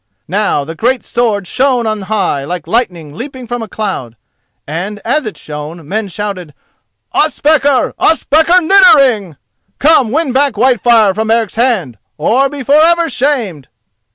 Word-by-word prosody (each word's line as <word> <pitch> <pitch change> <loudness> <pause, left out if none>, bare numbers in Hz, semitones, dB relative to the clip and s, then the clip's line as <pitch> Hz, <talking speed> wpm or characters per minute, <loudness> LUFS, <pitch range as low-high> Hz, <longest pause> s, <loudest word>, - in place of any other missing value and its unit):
Now 195 -5 0
the 160 - -7
great 245 +9 -1
sword 220 -5 -1
shone 255 +3 0
on 215 -1 -2
high 190 -8 -1
like 170 +2 -5
lightning 180 - -2
leaping 255 - -8
from 240 +1 -4
a 225 - -6
cloud, 190 - -5 0.5
and 180 +8 -5
as 265 +2 0
it 210 - -7
shone 150 +1 -8
men 215 +4 -2
shouted, 185 -5 -6 0.6
"Ospakar! 290 -3 +2
Ospakar 320 +3 +3
Niddering! 275 - +4 0.4
Come, 290 -5 +3
win 295 +2 -1
back 275 0 +2
Whitefire 235 -4 +3
from 220 +2 -3
Eric's 225 -3 +1
hand, 215 - -1 0.2
or 250 - +1
be 280 -1 -7
for 290 +5 +4
ever 335 -1 +2
shamed!" 240 - -2
225 Hz, 145 wpm, -13 LUFS, 185-275 Hz, 0.6 s, Niddering